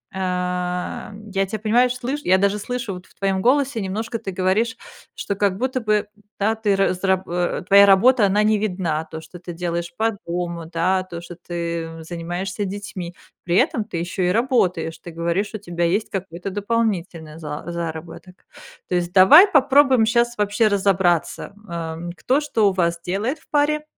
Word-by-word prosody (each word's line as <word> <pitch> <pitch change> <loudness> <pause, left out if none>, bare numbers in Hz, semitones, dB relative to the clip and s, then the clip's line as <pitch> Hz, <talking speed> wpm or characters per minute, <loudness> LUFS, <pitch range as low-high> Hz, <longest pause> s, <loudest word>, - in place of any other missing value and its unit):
ам, 180 +3 -3
я 195 0 +1
тебя, 215 - -4
понимаешь, 240 +4 +2
слышь 270 +4 -3
я 185 +1 +4
даже 200 +1 +1
слышу, 240 -3 -4
вот 180 0 -10
в - - -26
твоём 195 -1 0
голосе 260 0 +2
немножко, 220 +4 -3
ты 195 - -6
говоришь, 190 +5 0 0.4
что 200 - -3
как 195 -1 +1
будто 255 +1 -1
бы, 210 -1 +1 0.3
да, 215 +3 +2
ты 210 -3 +1
раз 195 -1 0
раб 190 -1 +1
э, 175 +1 -1
твоя 200 0 +8
работа, 220 +4 +5
она 205 +2 +2
не 215 -1 +3
видна, 180 -6 -2
то, 160 0 -8
что 175 +2 -12
ты 175 -1 -8
делаешь 170 0 -3
по 225 +1 +2 0.2
дому, 170 -1 -3
да, 180 +3 +1
то, 175 -2 -8
что 175 0 -10
ты 170 -1 -5
занимаешься 175 +4 -4
детьми. 190 -3 -6 0.3
При 175 0 -1
этом 250 -5 +2
ты 185 - -6
ещё 175 +2 -3
и 180 - +2
работаешь. 190 -9 +1
Ты 175 - -10
говоришь, 170 +6 -2
у - - -2
тебя 175 -3 -2
есть 195 +6 0
какой-то 190 0 -5
дополнительный 190 -7 -2
за 150 -2 -6
заработок. 170 +2 -7 0.4
То - - -3
есть, 175 0 -1
давай 200 - +9
попробуем 275 - +4
щас 235 0 +1
вообще 210 +2 +2
разобраться, 190 -4 +1
м, 210 - -20
ам, 165 0 -5
кто 265 +9 +1
что 225 -9 +2
у 190 - -3
вас 170 -2 0
делает 215 - -2
в - - -28
паре 300 +1 +1
190 Hz, 180 wpm, -22 LUFS, 175-220 Hz, 0.4 s, давай